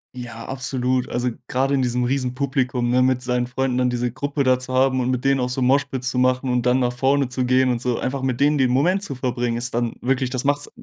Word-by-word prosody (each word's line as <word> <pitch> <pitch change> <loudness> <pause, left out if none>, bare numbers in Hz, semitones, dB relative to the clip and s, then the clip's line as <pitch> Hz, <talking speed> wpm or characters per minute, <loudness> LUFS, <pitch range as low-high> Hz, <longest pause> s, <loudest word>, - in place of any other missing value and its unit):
Ja, 120 -2 -8
absolut. 130 -1 -1
Also 125 +1 -1 0.2
grade 135 +2 0
in 135 - +2
diesem 125 0 0
Riesenpublikum, 130 -1 -1
ne, 125 +1 +3
mit 130 -1 +2
seinen 125 -1 -1
Freunden 130 0 -1
dann 125 -1 +2
diese 125 -1 -1
Gruppe 140 +2 -2
da 130 -1 +3
zu 130 0 -6
haben 130 0 +3
und 125 0 0
mit 125 0 -1
denen 135 -1 +2
auch 125 - 0
so 125 +1 -2
Moshpit 135 0 +1
zu 125 0 -2
machen 130 +1 +2
und 125 -1 0
dann 125 +1 +3
nach 125 0 +1
vorne 135 +1 +1
zu 125 0 -1
gehen 130 +1 +3
und 120 0 -2
so. 125 -2 -1
Einfach 135 +1 -3
mit 130 0 -2
denen 145 +1 +4
den 130 -2 +2
Moment 180 +10 +2
zu 140 - -5
verbringen, 120 -2 -2
ist 120 0 -4
dann 120 -1 -1
wirklich 130 0 0
das 130 -1 -3
macht's 145 +1 0
130 Hz, 250 wpm, -22 LUFS, 125-135 Hz, 0.2 s, denen